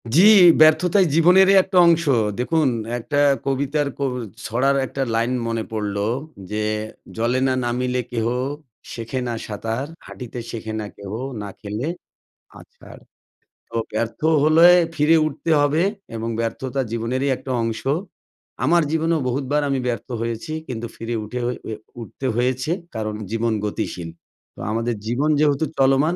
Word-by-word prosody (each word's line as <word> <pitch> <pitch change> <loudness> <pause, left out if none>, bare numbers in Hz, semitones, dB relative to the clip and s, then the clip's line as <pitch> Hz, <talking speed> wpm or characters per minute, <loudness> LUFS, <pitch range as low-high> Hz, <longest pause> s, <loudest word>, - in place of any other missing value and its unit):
জ্বি, 180 - +7 0.4
ব্যর্থতাই 170 +5 +5
জীবনেরই 185 +4 +6
একটা 190 -1 -2
অংশ। 170 0 +4 0.4
দেখুন 155 +4 +2 0.3
একটা 145 +5 -2 0.3
কবিতার 140 +2 0
কো 140 - -1 0.4
ছড়ার 135 +5 +1
একটা 135 +1 -5
লাইন 115 +2 +1 0.2
মনে 115 -1 -1
পড়লো, 105 -2 -2 0.5
"যে 105 0 -1 0.5
জলে 120 +3 +1
না 130 - +2
নামিলে 125 +1 -1
কেহ 115 -2 -1 0.7
শেখে 115 +3 -4
না 120 - -2
সাঁতার, 115 +5 -3 0.2
হাঁটিতে 125 -1 -8
শেখে 110 -1 -5
না 105 - -4
কেহ 100 -1 -8 0.3
না 100 - -6
খেলে 105 +6 -4 0.7
আছাড়।" - - -15 0.7
তো 115 - -10 0.2
ব্যর্থ 110 +1 -2 0.2
হলে 160 +3 +7 0.3
ফিরে 155 +2 +4
উঠতে 155 +2 -3
হবে 150 +4 +2 0.3
এবং 115 +1 -3
ব্যর্থতা 130 +4 -3
জীবনেরই 120 +4 -1
একটা 130 - -7
অংশ। 115 -1 -3 0.8
আমার 170 +5 +4
জীবনেও 160 0 +1
বহুতবার 135 +3 0
আমি 135 -1 0
ব্যর্থ 115 -4 -3
হয়েছি। 115 +5 -4 0.2
কিন্তু 120 -2 -4
ফিরে 115 +1 -4
উঠে 125 +4 -5
ঐ - - 0 0.2
এ - - -2 0.3
উঠতে 115 +4 -8
হয়েছে 130 +4 0 0.2
কারণ 110 -1 -3 0.2
জীবন 115 0 0
গতিশীল। 90 -4 -4 0.5
তো - - -15
আমাদের 115 +1 -1
জীবন 135 +6 0
যেহেতু 150 0 +2
চলমান 135 +5 +3
125 Hz, 140 wpm, -22 LUFS, 115-150 Hz, 0.8 s, জ্বি